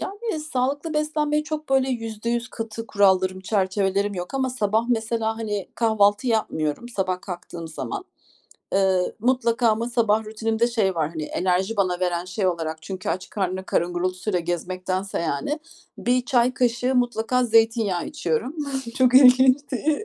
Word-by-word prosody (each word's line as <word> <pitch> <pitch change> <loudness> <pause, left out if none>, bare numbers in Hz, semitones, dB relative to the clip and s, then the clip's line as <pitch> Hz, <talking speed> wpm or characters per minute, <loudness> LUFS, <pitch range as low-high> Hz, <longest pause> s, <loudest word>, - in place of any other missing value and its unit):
Yani, 410 -3 -4
sağlıklı 290 +2 -2
beslenmeye 300 0 0
çok 310 0 -5
böyle 265 0 +3
%100 235 0 -3
katı 225 0 -6
kurallarım, 190 -3 +2
çerçevelerim 195 0 0
yok 180 +6 -6
ama 260 -1 0
sabah 220 -2 +1
mesela, 225 -1 0
hani, 210 -3 -3
kahvaltı 215 0 +2
yapmıyorum 215 -4 -1
sabah 185 -5 -2
kalktığım 175 -3 -7
zaman. 370 - -5 0.7
Iıı, 190 -2 +2
mutlaka 240 -1 +2
ama 225 +2 +1
sabah 220 -2 +2
rutinimde 220 +1 0
şey 215 -6 +1
var. 155 -2 0
Hani, 155 -2 -5
enerji 185 +6 0
bana 185 -3 +1
veren 175 -1 0
şey 190 +2 -2
olarak 160 -3 -2
çünkü 185 +2 -6
aç 180 +3 -3
karnına 190 -2 -2
karın 175 -1 0
gurultusuyla 185 +2 -1
gezmektense, 185 +3 -3
yani, 170 - -2 0.4
1 250 0 +1
çay 245 0 +2
kaşığı 245 +1 +1
mutlaka 245 0 +1
zeytinyağı 225 -5 +2
içiyorum. 225 - -2 0.4
Çok 255 -1 +4
ilginç, 260 0 +7
de 300 - 0
220 Hz, 145 wpm, -24 LUFS, 185-250 Hz, 0.7 s, ilginç